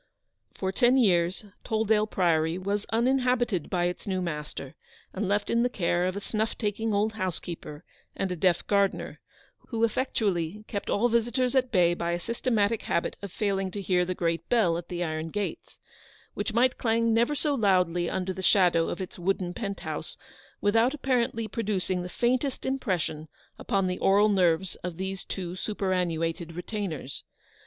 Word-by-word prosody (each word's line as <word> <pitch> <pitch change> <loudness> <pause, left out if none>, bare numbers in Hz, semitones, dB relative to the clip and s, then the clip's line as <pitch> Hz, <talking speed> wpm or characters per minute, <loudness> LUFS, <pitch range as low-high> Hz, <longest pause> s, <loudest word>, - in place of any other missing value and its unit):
315 - - -21
For 190 -1 0
ten 245 +5 +4
years 185 -4 +2 0.2
Tolldale 220 -1 +1
Priory 165 -3 +2
was 200 +2 -2
uninhabited 240 - +1
by 180 -2 0
its 180 +3 -3
new 190 -1 0
master, 150 -4 -5 0.4
and 195 +1 -2
left 205 +1 0
in 235 - +3
the 245 - +2
care 175 -4 +1
of 185 - -2
a - - -2
snuff 220 +2 -2
taking 220 0 -1
old 210 +2 +1
housekeeper, 175 -5 -5 0.3
and 190 - -2
a - - -1
deaf 175 0 +2
gardener, 200 -1 0 0.5
who 230 -2 -2
effectually 210 -6 0
kept 200 -3 -4
all 230 +4 +3
visitors 240 +2 +1
at 255 -2 +2
bay 175 -5 +4
by 170 0 -2
a 175 - -1
systematic 230 +1 0
habit 170 - -1
of 200 -2 -6
failing 195 -2 -1
to 200 - -6
hear 180 -2 +2
the 180 +1 -2
great 165 -1 -1
bell 210 -9 +3
at 170 0 -5
the 175 -1 -3
iron 155 -1 -3
gates; 205 +3 -4 0.5
which - - -2
might 245 +3 +2
clang 230 0 +2
never 235 +6 +2
so 295 0 +1
loudly 180 -7 +2
under 190 0 -2
the 190 - -6
shadow 180 -4 +4
of - - -4
its 185 - -7
wooden 180 0 -1
pent 200 -1 -4
house - - -5 0.4
without 225 +6 +3
apparently 240 -5 0
producing 195 -4 -1
the 180 - -5
faintest 255 +6 0
impression 185 - -1 0.3
upon 195 -1 0
the 180 0 -2
aural 205 +2 +4
nerves 180 -2 +2
of 175 -2 -6
these 190 +1 -4
two 180 -2 -5
superannuated 175 -5 -1
retainers. 175 - -4
195 Hz, 170 wpm, -28 LUFS, 175-225 Hz, 0.5 s, ten